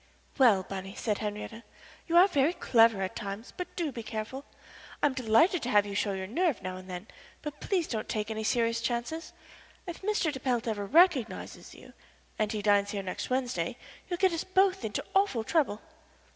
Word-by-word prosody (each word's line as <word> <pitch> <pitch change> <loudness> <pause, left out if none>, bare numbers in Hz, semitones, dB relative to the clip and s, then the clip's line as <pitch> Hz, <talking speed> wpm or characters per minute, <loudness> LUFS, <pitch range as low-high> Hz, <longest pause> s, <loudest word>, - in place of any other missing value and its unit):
"Well, 220 -8 +6
Bunny," 195 +1 -7
said 210 -3 -1
Henriette, 210 +1 -5 0.5
"you 340 0 +3
are 365 +3 +8
very 295 -2 +2
clever 225 - +4
at 185 - -4
times, 200 +3 -6
but 360 0 -6
do 330 -5 -1
be 235 - -6
careful. 225 +5 -5 0.6
I - - +7
am 290 - +3
delighted 260 - +3
to 245 - -3
have 205 -3 +4
you 200 - -6
show 200 0 0
your 190 -1 -4
nerve 300 - 0
now 185 0 -4
and 185 0 -11
then, 180 +2 -6 0.4
but 295 -1 -6
please 365 -5 0
don't 220 -2 -4
take 215 0 -2
any 220 0 -3
serious 230 0 +1
chances. 240 +8 -3 0.5
If 345 -2 -7
Mr. 400 -5 +1
de 265 - -5
Pelt 245 -2 -1
ever 205 -3 -2
recognizes 305 - +2
you - - -15 0.5
and 215 -1 +1
he 210 -2 -3
dines 205 -1 +3
here 200 -1 -3
next 185 - -4
Wednesday 245 -7 -1 0.3
you'll 350 - -1
get 375 -1 +3
us 330 - -2
both 380 0 +2
into - - -3
awful 385 - +2
trouble." 270 -6 +1
235 Hz, 195 wpm, -29 LUFS, 210-325 Hz, 0.6 s, are